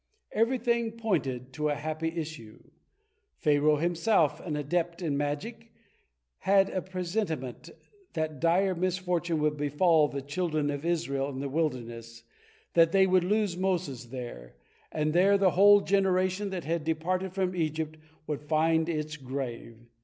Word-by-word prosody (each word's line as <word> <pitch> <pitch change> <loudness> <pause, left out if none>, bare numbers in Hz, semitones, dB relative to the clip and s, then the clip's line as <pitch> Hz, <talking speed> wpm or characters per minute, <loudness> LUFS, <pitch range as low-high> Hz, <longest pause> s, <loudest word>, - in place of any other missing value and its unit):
Everything 235 0 +1
pointed 140 - -2
to 150 +2 -1
a 145 - 0
happy 155 +2 -3
issue. 155 -9 -7 0.7
Pharaoh, 150 -1 +3
himself 165 -1 +2
an 160 -4 -4
adept 170 +3 -1
in 150 -4 0
magic, 205 +11 -4 0.7
had 195 0 +3
a 185 - -1
presentiment 180 - -4 0.4
that 155 -4 -3
dire 185 +5 +3
misfortune 180 -2 -1
would 150 0 +1
befall 150 +2 +3
the 140 -2 -5
children 155 0 -1
of 145 +2 -5
Israel 140 -5 -1
in 135 - -6
the 140 - -3
wilderness, 120 -6 -3 0.5
that 165 -1 +5
they 190 0 +5
would 185 -1 +3
lose 205 -1 +1
Moses 175 -9 -2
there, 120 - -8 0.4
and 155 0 0
there 195 +3 +5
the 195 -2 +3
whole 205 +3 +7
generation 190 0 +1
that 185 -3 -4
had 165 0 -2
departed 175 +4 -1
from 185 -1 -1
Egypt 155 -1 -2 0.3
would 150 -2 -3
find 160 +2 +2
its 155 -2 -3
grave. 130 -4 -6
160 Hz, 140 wpm, -29 LUFS, 145-185 Hz, 0.7 s, whole